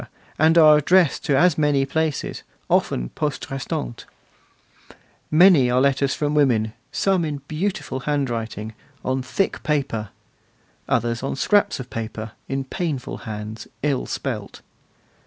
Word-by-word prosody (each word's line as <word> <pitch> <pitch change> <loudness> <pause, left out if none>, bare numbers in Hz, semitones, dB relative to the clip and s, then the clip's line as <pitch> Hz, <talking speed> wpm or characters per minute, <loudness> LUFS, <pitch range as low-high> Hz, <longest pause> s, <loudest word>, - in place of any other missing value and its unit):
and 160 +2 +5
are 155 -2 +8
addressed 175 +2 +3
to 140 - +2
as 175 0 +4
many 145 -2 +2
places, 155 +1 -2 0.3
often - - +1
poste 150 -3 -4
restante. 95 - -4 1.2
Many 155 -5 +6
are 125 +1 +3
letters 135 0 +2
from 150 0 -1
women, 120 -7 +2 0.2
some 190 -3 +1
in 145 -3 -4
beautiful 155 -5 -3
handwriting, 115 -6 -3 0.3
on 130 +1 0
thick 190 +9 -1
paper; 130 -8 -1 0.8
others 115 0 0
on 135 - -2
scraps 205 +6 +2
of 125 -1 -8
paper, 110 -1 -5 0.2
in 135 0 -1
painful 140 -1 -4
hands, 105 +1 -6 0.2
ill 140 -3 0
spelt. - - -5
135 Hz, 125 wpm, -22 LUFS, 120-155 Hz, 1.2 s, are